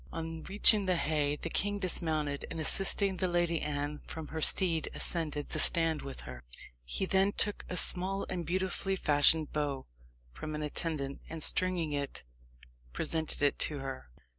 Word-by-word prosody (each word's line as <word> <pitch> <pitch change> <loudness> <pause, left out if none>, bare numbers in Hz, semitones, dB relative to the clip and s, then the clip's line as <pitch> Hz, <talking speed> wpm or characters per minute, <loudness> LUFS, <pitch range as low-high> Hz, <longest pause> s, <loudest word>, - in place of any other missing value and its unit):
On 165 0 -6
reaching 205 0 +3
the 185 - +2
haye, 150 -3 -1
the 165 +2 -7
king 205 0 0
dismounted, 160 -6 -2
and 165 - -7
assisting 195 +3 +3
the 185 - -1
Lady 175 -2 -1
Anne 145 0 -4
from 160 -2 -8
her 160 0 -5
steed, 165 -1 +4
ascended 150 -4 0
the - - -2
stand 165 -2 +5
with 135 -1 -9
her. 65 -1 -10 0.4
He 60 - -3
then 195 +2 +1
took 205 - 0
a 180 - -3
small 190 +3 +2
and 180 -2 -4
beautifully 190 +3 -2
fashioned 150 -1 +2
bow 145 -3 -3 0.5
from 155 - -7
an 150 - -4
attendant, 150 -2 -4
and 160 -1 -3
stringing 180 -4 +3
it, 140 -1 -4 0.7
presented 160 - -3
it 145 - +1
to 150 - +1
her. 135 - -8
160 Hz, 165 wpm, -30 LUFS, 145-185 Hz, 0.7 s, stand